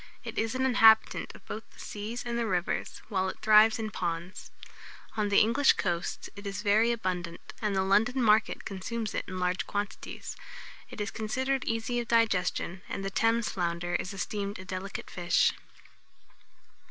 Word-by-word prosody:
It - - -4
is 225 +2 -1
an 260 0 +1
inhabitant 225 -4 +5
of - - -16
both 220 - -6
the - - -20
seas 215 +4 -5
and 240 -1 -2
the 235 -1 0
rivers, 180 -3 -2
while 190 -3 0
it - - -7
thrives 215 +1 +6
in 220 -1 -4
ponds. 175 0 -4 0.7
On 210 -2 0
the 200 - +3
English 245 +6 +5
coasts 175 -1 -2
it 200 0 -8
is 200 +1 -4
very 215 +3 +4
abundant, 180 -6 -4
and 210 -2 0
the 190 - +2
London 220 +7 +3
market 220 -2 +3
consumes 215 +3 -4
it - - -2
in 185 - -5
large 180 0 -1
quantities. 205 0 -5 0.5
It - - -9
is 205 - -2
considered 260 +5 -1
easy 225 +2 -1
of 235 - -4
digestion, 190 -5 +1
and 195 - -4
the 195 - -2
Thames 225 +2 +2
flounder 175 -1 -2
is 185 - -1
esteemed 200 +1 -3
a 185 - -9
delicate 185 +1 -5
fish. 175 -1 +2
210 Hz, 170 wpm, -29 LUFS, 185-225 Hz, 0.7 s, thrives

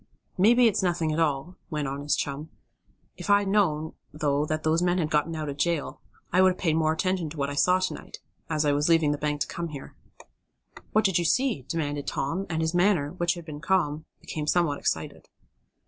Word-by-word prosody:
"Maybe 235 +6 +5
it's 215 -2 +3
nothing 170 -4 0
at 155 - -1
all," 160 +3 -1
went 150 -4 -2
on 140 +1 -4
his 145 +1 +1
chum. 145 +3 -4 0.7
"If - - -7
I 205 0 +6
had 200 - -3
known, 160 -7 +1 0.2
though 145 -1 0
that 155 +1 -2
those 160 +2 +2
men 180 0 +2
had 160 -3 -1
gotten 155 +2 +1
out 155 -1 -4
of 140 -1 -5
jail, 165 0 -1 0.3
I 185 - +5
would 185 0 +5
have - - -16
paid 160 -4 +1
more 160 -1 +2
attention 180 0 -1
to 155 - -10
what 140 0 -1
I - - -4
saw 180 +6 +3
to 185 - -1
night, - - -10 0.3
as 155 -1 0
I 145 - +3
was 145 +3 +1
leaving 165 -3 +4
the 145 - -2
bank 150 -1 -2
to - - +1
come 170 0 -4
here." 145 -4 -9 1.0
"What 215 +1 +3
did 190 -3 +3
you 170 - -1
see?" 230 - +1
demanded 145 -3 -3
Tom, 170 +8 -2
and 160 -1 -1
his 160 +1 -1
manner, 175 -5 +2
which 175 0 0
had 170 -1 -9
been 150 -2 -8
calm, 160 -4 0 0.2
became 150 -1 -5
somewhat 165 -5 +2
excited. - - -3
160 Hz, 225 wpm, -26 LUFS, 150-180 Hz, 1.0 s, I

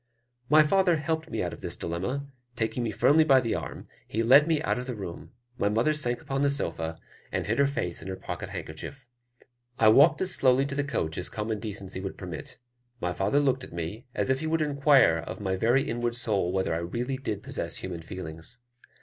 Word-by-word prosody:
My 155 +1 +7
father 180 +2 +3
helped 160 +1 -2
me - - -2
out - - -3
of - - -10
this - - -3
dilemma; 95 +12 -3 0.3
taking 110 +1 -1
me 120 - -1
firmly 140 +9 +4
by 135 -4 +6
the 115 -3 -1
arm, - - -5 0.2
he 115 +2 -1
led 140 +6 +7
me 160 -2 +2
out 125 - 0
of 125 - -6
the 125 - -3
room: 95 -5 -7 0.3
my 100 - +2
mother 115 +9 +2
sank 120 -5 -2
upon 135 0 -2
the 140 - +3
sofa, 80 - -3 0.3
and - - -1
hid 115 +5 0
her 140 - +5
face 115 -11 -2
in 85 - -8
her 95 - -3
pocket - - -6
handkerchief. 125 - -7 0.7
I 110 - +6
walked 145 +7 +6
as 190 0 +3
slowly 130 -4 +3
to 140 - -4
the 145 +1 0
coach 80 - -2
as 90 - -1
common 110 0 -3
decency 100 -3 -4
would 95 0 -5
permit. 90 -4 -7 0.4
My 90 0 -1
father 95 - +1
looked 130 -2 +1
at - - -9
me, 85 +8 -5
as - - +1
if 130 - +1
he 160 - -3
would 160 0 +1
inquire 140 - +4
of 85 - -7
my 95 -2 -1
very 120 +8 +2
inward 120 0 -1
soul 105 -7 0
whether 95 -3 0
I 80 - -1
really 120 +10 -3
did 105 -6 -4
possess - - -3
human 90 -3 -5
feelings? 80 +5 -7
120 Hz, 220 wpm, -28 LUFS, 95-140 Hz, 0.7 s, My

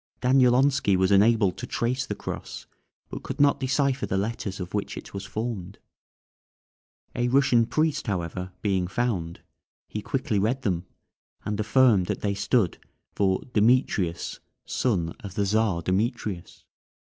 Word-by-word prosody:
Danielonski 130 -3 +4
was 95 +1 +2
enabled 100 -1 +4
to 125 - -6
trace 125 +2 -1
the - - -3
cross, - - -7 0.5
but - - -6
could - - -6
not 140 0 +4
decipher 135 0 0
the 95 - -1
letters 100 -1 -3
of 90 -1 -6
which 105 -1 -3
it - - -9
was 100 -1 -6
formed. 105 -4 -4 1.4
A 120 0 +1
Russian 125 -3 +3
priest, 155 -2 0
however, 90 -1 -3
being 95 -4 +1
found, 95 -6 -2 0.5
he 105 - -5
quickly 130 -3 -1
read 120 +7 0
them, 90 -4 -1 0.6
and 105 0 -2
affirmed 110 -4 +4
that - - -3
they 100 -1 0
stood 100 -1 +1 0.3
for 95 -2 +1
"Demetrius, 105 -6 +1 0.3
son 90 -10 0
of 100 -3 -9
the 100 - +1
Czar 100 -4 +1
Demetrius." 95 -1 -2
105 Hz, 140 wpm, -26 LUFS, 95-125 Hz, 1.4 s, Danielonski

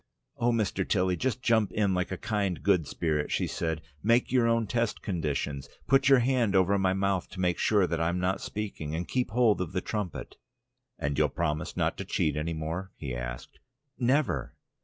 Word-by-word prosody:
"Oh, 120 +1 +2
Mr. 105 -4 0
Tilly! 90 -2 +2
Just 125 +3 -2
jump 110 -3 +3
in 100 -3 +1
like 90 +1 0
a 95 - -2
kind 105 -3 -2
good 90 -7 +3
spirit," 75 -3 -1
she - - +1
said. 80 -2 -3 0.2
"Make 115 +3 +3
your 125 -2 +3
own 115 -1 +2
test 115 +1 -1
conditions. 75 -6 -2 0.2
"Put 135 0 +4
your 135 - +8
hand 120 -4 +2
over 95 +1 +4
my 95 -1 +2
mouth 95 -1 0
to 95 - -10
make 90 -2 +1
sure 105 -4 +3
that 85 -2 -2
I'm 85 +2 0
not 90 +1 0
speaking, 95 -8 -4
and 85 +2 -3
keep 125 -1 0
hold 110 -3 +3
of 90 0 -4
the 90 - +1
trumpet." 105 -5 -4 0.6
"And 70 -1 -2
you'll - - +4
promise 75 -2 -2
not - - 0
to - - -4
cheat 75 -2 0
any 80 +2 -2
more?" 80 +4 -4
he 70 -5 -5
asked. - - -6 0.4
"Never!" 135 +4 +1
95 Hz, 195 wpm, -29 LUFS, 85-115 Hz, 0.6 s, your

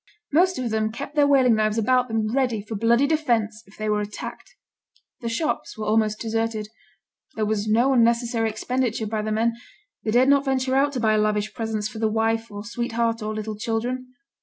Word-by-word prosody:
Most 365 +3 +4
of 245 -3 -2
them 220 0 0
kept 275 +5 -7
their 295 -1 +4
whaling 260 -4 +5
knives 215 0 +1
about 250 +3 +2
them 220 -1 -1
ready 250 -5 +1
for 210 +2 -7
bloody 230 +5 +3
defence 235 -8 0
if 195 - -19
they 215 - -3
were 210 0 +1
attacked. 210 0 -7 0.6
The 235 - -4
shops 305 +2 -2
were 215 - -4
almost 215 0 +1
deserted; 225 -1 -2 0.7
there 220 - 0
was 210 0 -1
no 235 +5 +3
unnecessary 235 -1 +2
expenditure 230 +1 -1
by 215 0 -2
the 215 0 -3
men; 225 +2 +1 0.5
they - - -2
dared 245 +4 +4
not 280 0 +4
venture 260 -1 0
out 280 +2 +3
to 255 - -2
buy 215 -2 +3
lavish 210 0 0
presents 220 -3 -2
for 220 0 -9
the 220 - +2
wife 225 +1 0
or 205 0 -8
sweetheart 230 0 -1
or 215 0 -3
little 215 0 -4
children. 245 +4 -3
225 Hz, 195 wpm, -24 LUFS, 215-250 Hz, 0.7 s, whaling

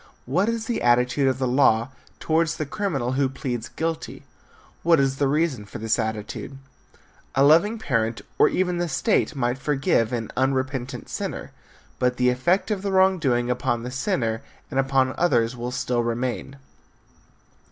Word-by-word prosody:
What 185 - +1
is 230 -1 -2
the 235 - -2
attitude 125 +3 +3
of 130 -1 +1
the 130 -1 0
law 120 -2 +3 0.3
towards 165 0 +1
the 155 - -2
criminal 145 - -2
who 135 0 +1
pleads 120 -3 -4
guilty? 165 0 -4 0.6
What 165 -2 +4
is 135 -1 +1
the 140 - +2
reason 145 -5 0
for 100 - -9
this 110 +2 0
attitude? 110 +4 -4 0.8
A 135 - +4
loving 170 +10 +5
parent 115 - -1 0.2
or - - +6
even 180 -1 0
the 175 -1 -1
state 160 - +1
might 125 -1 -1
forgive 135 -5 +1
an 115 -3 -3
unrepentant 130 -1 -1
sinner, - - -5 0.5
but 125 0 +1
the 125 0 +3
effect 175 - +1
of 200 -3 -1
the 200 0 -2
wrong 190 -1 +4
doing 125 -4 +1
upon 120 -2 -1
the 125 - -5
sinner 125 - -1 0.3
and 135 - 0
upon 135 -1 +2
others 125 -8 +2
may 120 0 -4
still 125 -1 -1
remain. 120 +3 -3
130 Hz, 165 wpm, -24 LUFS, 120-160 Hz, 0.8 s, or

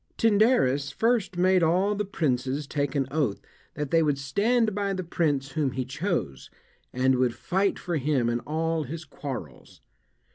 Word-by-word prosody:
Tyndarus 205 - +3
first 220 - 0
made 185 +1 +4
all 180 +5 +2
the 210 0 -2
princes 140 -5 -1
take 140 0 -2
an 135 -1 +1
oath 140 -9 0 0.4
that 145 -2 -4
they 165 - +4
would 150 -3 +1
stand 215 - +1
by 200 0 -1
the 185 -1 -3
prince 145 -5 0
whom 145 -3 -1
he 130 -1 -2
chose, 150 - -3 0.4
and 130 +1 +2
would 125 -2 +1
fight 195 +2 0
for 175 -3 -2
him 135 -4 +1
in 120 0 0
all 160 +4 -1
his 155 +3 -6
quarrels. 130 - -8
155 Hz, 160 wpm, -26 LUFS, 135-190 Hz, 0.4 s, made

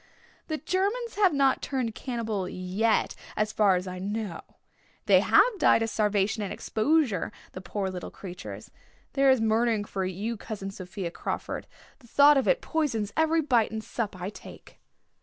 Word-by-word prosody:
"The 315 - -2
Germans 410 +8 -1
have 395 -3 +5
not 275 -2 +2
turned 255 -5 -2
cannibal 220 -7 -3
yet 190 +5 0 0.2
as 215 0 +1
far 200 -3 +4
as 180 +1 -2
I 185 0 -5
know. 205 -2 -4 0.6
They - - +6
have 465 -5 +4
died 225 - +5
of 225 - -2
starvation 210 0 +1
and 200 - -3
exposure, 240 - +1 0.2
the 185 - -8
poor 190 +2 -3
little 180 -1 -6
creatures. 180 -2 -9 0.4
There 275 0 +4
is 260 -2 +5
murdering 225 0 +2
for 195 -2 -3
you, 200 +5 -3
Cousin 200 -2 -6
Sophia 185 -2 -6
Crawford. - - -4 0.3
The 240 - -19
thought 285 +5 +6
of 270 - +1
it - - +3
poisons 230 -11 -1
every 320 +1 +3
bite 245 -7 +2
and 220 0 -5
sup 210 -6 -4
I 180 +3 -4
take." - - -13
220 Hz, 165 wpm, -27 LUFS, 195-275 Hz, 0.6 s, They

